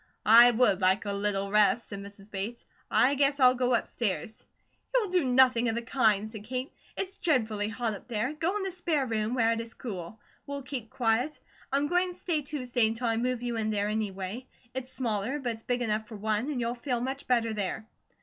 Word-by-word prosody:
"I 235 +3 +9
would 230 -5 +3
like 190 +3 +3
a 200 - -2
little 200 -1 -1
rest," 210 +2 +4
said 200 - -6
Mrs. 200 +1 -12
Bates. 205 +5 -4 0.2
"I 260 +3 +4
guess 280 0 +2
I'll 255 -1 +7
go 250 -1 +2
upstairs." 220 -1 -2 0.5
"You'll 445 -6 +2
do 365 -3 +3
nothing 250 -2 +4
of 225 - -1
the 235 - -3
kind," 215 -4 +2
said 215 -2 -9
Kate. 255 +4 -4 0.2
"It's 390 0 -4
dreadfully 220 -9 +1
hot 225 0 -2
up 200 - -10
there. 240 +4 -1
Go 330 +6 -1
in 410 - -3
the 385 - -2
spare 335 -6 -1
room, 220 0 -1
where 230 -2 +3
it 230 0 -1
is 230 0 -9
cool; 200 -2 -7 0.3
we'll 280 -1 -5
keep 255 -4 -5
quiet. 245 +6 0 0.3
I 275 - +2
am 285 +1 +1
going 360 +2 +1
to - - -15
stay 335 -4 -1
Tuesday 250 -5 0
until 225 +3 -3
I 225 - +1
move 245 0 -1
you 240 -1 -2
in 220 -1 -1
there, 205 -1 0
anyway. 210 +2 -3 0.3
It's 260 0 -5
smaller, 240 0 -1
but 255 -4 -2
it's 225 - -11
big 245 0 -1
enough 215 -1 -1
for 220 - -9
one, 215 +5 -1
and 280 -4 -2
you'll 235 0 -1
feel 245 0 -2
much 265 +3 -4
better 230 -3 +2
there." 210 +1 -3
235 Hz, 215 wpm, -29 LUFS, 215-260 Hz, 0.5 s, I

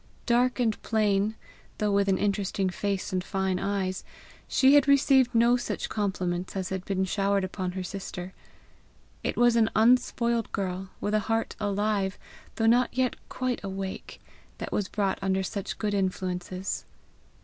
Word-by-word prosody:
Dark 245 +1 +2
and 225 -3 +1
plain, 210 -1 +1 0.4
though 210 -1 0
with 200 0 +2
an 190 - +3
interesting 200 -2 0
face 195 0 -2
and 185 -1 0
fine 190 -1 -1
eyes, 195 -2 -2 0.4
she 265 +1 +5
had 290 -1 +6
received 270 -3 +4
no 235 +2 +5
such - - -3
compliments 185 -4 -2
as 190 -2 -2
had 190 -1 -3
been 190 -1 0
showered 200 +1 +1
upon 185 -1 -3
her 190 0 -4
sister; 185 -1 -6 0.9
it - - -2
was 240 -1 +5
an 225 -1 +4
unspoiled 235 0 +3
girl, 190 -1 -3
with 205 - -2
a 215 - +4
heart 225 0 0
alive 205 -1 0 0.4
though 225 - 0
not 240 +2 +4
yet 255 -1 +2
quite 255 -3 -2
awake, 195 -1 -5 0.4
that - - -6
was 205 - 0
brought 195 -1 -1
under 190 0 +1
such 195 +1 -4
good 210 -2 -1
influences. 185 -1 -2
200 Hz, 155 wpm, -27 LUFS, 190-225 Hz, 0.9 s, had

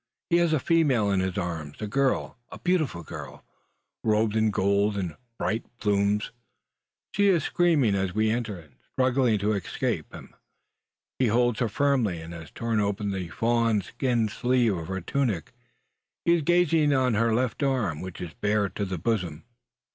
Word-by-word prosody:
He 170 - +5
has 170 -2 +3
a 155 - +2
female 135 -11 +2
in 100 - +2
his 95 0 -2
arms 85 -6 -4
a 110 - -3
girl, 135 +5 0 0.2
a - - -8
beautiful 155 - 0
girl, - - -9 0.6
robed 110 0 +2
in 110 0 +3
gold 100 +1 +1
and 90 -6 -3 0.2
bright 110 +1 -1
plumes. 105 -1 +1 0.8
She 200 0 +3
is 175 -6 +3
screaming 160 - +2
as 95 -1 0
we 110 0 +2
enter, 110 -4 -2
and 75 -6 -16
struggling 130 -3 +2
to 105 +2 0
escape 100 -4 -2
him. - - -11 0.9
He 130 - +3
holds 120 +1 +2
her 120 - +1
firmly, 120 -7 +1
and 80 +1 -8
has 80 -2 -9
torn 115 -2 -1
open 100 0 -1
the 95 -3 -3
fawn 115 -1 +1
skin 120 +1 0
sleeve 120 0 +1
of 80 -2 -5
her 95 +1 -3
tunic. 110 - -1 0.7
He 170 - +5
is 170 - +2
gazing 165 -2 +3
on 130 -2 +2
her 115 +2 +2
left 120 +3 0
arm, 125 - 0
which 95 -1 -7
is 85 -3 -6
bared 105 +3 0
to 100 - -1
the 95 -1 -4
bosom! 90 -5 -2
110 Hz, 170 wpm, -26 LUFS, 95-130 Hz, 0.9 s, He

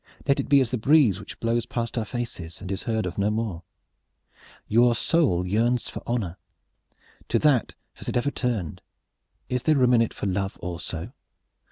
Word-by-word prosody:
Let 140 - +3
it - - -2
be 140 -1 +7
as 125 -3 -1
the 125 - -1
breeze 130 - +4
which 105 - -10
blows 115 +1 0
past 115 -1 -3
our 115 -3 -1
faces 105 -9 -5
and 95 - -6
is 95 - -2
heard 110 -2 0
of 90 +2 -4
no 100 +1 +2
more. 105 -6 -2 1.1
Your 120 +2 +4
soul 115 - +2
yearns 115 +6 +1
for - - -7
honor. 105 -8 -2 0.9
To - - +3
that 145 -6 +2 0.2
has - - -8
it - - 0
ever 140 +4 +1
turned. 115 - -2 0.7
Is 125 -1 -1
there 155 +3 +3
room 125 -2 +4
in 115 - +5
it 115 - -1
for - - -4
love 95 0 -1
also? 85 - -5
115 Hz, 185 wpm, -25 LUFS, 95-125 Hz, 1.1 s, be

